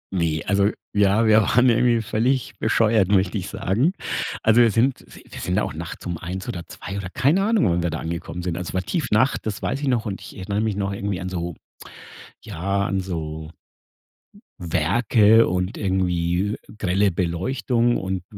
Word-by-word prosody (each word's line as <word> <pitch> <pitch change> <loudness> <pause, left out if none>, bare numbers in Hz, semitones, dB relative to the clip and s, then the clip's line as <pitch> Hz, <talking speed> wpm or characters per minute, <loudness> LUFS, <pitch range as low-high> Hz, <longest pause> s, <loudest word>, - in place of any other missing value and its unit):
Ne, 80 -3 0
also 100 0 +2 0.3
ja, 100 +2 +3
wir 110 0 +6
waren 125 +5 +3
ja 115 - +5
irgendwie 120 -1 +2
völlig 120 +3 0
bescheuert, 110 -3 +3
möchte 95 -2 +2
ich - - -6
sagen. 125 - 0 0.5
Also, 110 +2 +5
wir 115 - +6
sind 120 +5 +1
wir - - -14
wir - - -9
sind - - -1
da - - +2
auch - - -4
nachts 85 +1 -7
um 85 -2 -4
1 95 +2 -6
oder 85 -2 -5
2 100 - -7
oder, 95 -2 -5
keine 145 - +2
Ahnung, 220 0 +2
wann 85 0 +1
wir 85 - 0
da - - -3
angekommen 85 +1 -5
sind. 90 -2 -2
Also, 90 +1 -5
war 95 - 0
Tiefnacht, 130 - +1
das 105 -1 -4
weiß 135 +3 -2
ich 145 - -2
noch 120 -4 +1
und 100 -2 -4
ich - - -11
erinnere 100 +2 -2
mich 110 -2 -1
noch 100 -1 -2
irgendwie 100 -2 -3
an 95 - -4
so 85 -3 -4 0.9
ja, 100 +4 -2
an 95 - -1
so 80 -4 -5 1.1
Werke 105 +7 +3
und 90 +2 -2
irgendwie 95 0 0 0.2
grelle 100 0 +2
Beleuchtung 115 +8 0
und 95 -1 -3
100 Hz, 185 wpm, -23 LUFS, 90-115 Hz, 1.1 s, wir